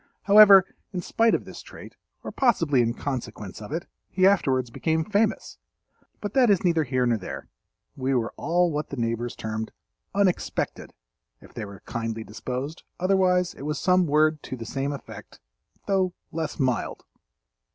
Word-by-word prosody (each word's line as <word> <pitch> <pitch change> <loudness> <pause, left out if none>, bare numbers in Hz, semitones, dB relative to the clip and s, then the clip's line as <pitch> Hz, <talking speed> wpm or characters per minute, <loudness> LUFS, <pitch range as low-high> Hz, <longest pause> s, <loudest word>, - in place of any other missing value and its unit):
However, 200 -2 +8 0.3
in 180 - -3
spite 230 0 +3
of - - -4
this - - -9
trait, - - -12 0.3
or - - -5
possibly 165 - +2
in 115 0 0
consequence 120 -8 -5
of 105 - -9
it, 165 +3 -3 0.2
he 185 0 +2
afterwards 130 -11 +2
became 160 +4 0
famous. 210 +1 0 0.6
But 205 -1 -4
that 255 -4 +4
is 195 -4 +3
neither 165 -4 +2
here 130 -1 0
nor 115 -2 +1
there—we 130 - -6
were 115 -2 -1
all 175 +3 +1
what 150 0 -3
the 140 - -6
neighbors 115 0 -2
termed 110 0 -4 0.4
"unexpected," 195 -3 -1 0.4
if - - -17
they - - -5
were 100 -1 -11
kindly 115 -1 -4
disposed, 130 +8 -5 0.2
otherwise 185 -1 +2
it - - -13
was 150 +2 -2
some 180 -1 +3
word 155 +1 +3
to 130 - -7
the 115 - -7
same 135 +5 -2
effect 140 - -10 0.5
though 190 -2 +1 0.2
less 160 -1 -4
mild. 130 -3 -1
150 Hz, 160 wpm, -25 LUFS, 120-185 Hz, 0.6 s, However